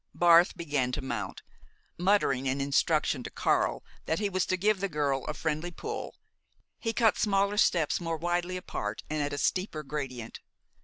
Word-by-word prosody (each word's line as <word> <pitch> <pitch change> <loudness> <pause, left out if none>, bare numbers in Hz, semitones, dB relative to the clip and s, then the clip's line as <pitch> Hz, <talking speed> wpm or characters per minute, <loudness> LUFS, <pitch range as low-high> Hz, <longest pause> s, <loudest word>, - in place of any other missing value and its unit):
Barth 175 0 +5
began 145 -6 -1
to 145 - -2
mount. 115 -7 -4 0.5
Muttering 170 -9 +2
an 130 +2 0
instruction 140 0 +1
to - - -6
Karl - - +1 0.2
that 160 - +1
he 205 -1 0
was 185 -1 0
to 185 - +1
give 205 +2 +2
the 200 +1 -1
girl 145 -4 0
a 150 - -3
friendly 155 +3 -2
pull, 175 - -6 0.6
he 225 - -1
cut 225 -1 +3
smaller 200 0 +2
steps 170 -5 +2
more 165 -1 -2
widely 175 +2 -1
apart 105 -11 -4
and 155 -1 0
at 145 0 -1
a 145 - -3
steeper 170 0 -1
gradient. 135 -5 -5
160 Hz, 170 wpm, -29 LUFS, 140-185 Hz, 0.6 s, Barth